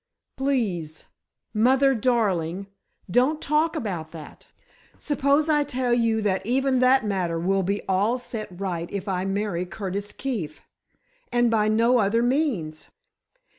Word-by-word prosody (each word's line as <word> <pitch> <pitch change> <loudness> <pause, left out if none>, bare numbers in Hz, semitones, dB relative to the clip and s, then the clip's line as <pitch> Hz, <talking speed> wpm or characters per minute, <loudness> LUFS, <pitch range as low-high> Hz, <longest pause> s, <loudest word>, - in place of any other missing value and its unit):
"Please, 205 - -2 0.5
mother 265 +5 +4
darling, 200 -7 0 0.4
don't 255 - +2
talk 310 +3 +1
about 185 - -4
that. 155 -3 -11 0.5
Suppose 290 +1 +1
I 300 -2 +3
tell 255 -3 -1
you 225 -2 +1
that 190 -2 0
even 260 +3 +1
that 255 -1 +4
matter 185 -5 -1
will 195 +3 +1
be 200 +3 -2
all 200 +6 +1
set 225 -3 -5
right 175 -4 -3
if 200 0 -4
I 185 -1 -1
marry 195 -2 -1
Curtis 200 +2 -5
Keefe—and 240 - -4
by 215 -2 +2
no 230 +3 +3
other 225 +3 +2
means. 240 - -1
220 Hz, 130 wpm, -24 LUFS, 190-260 Hz, 0.5 s, mother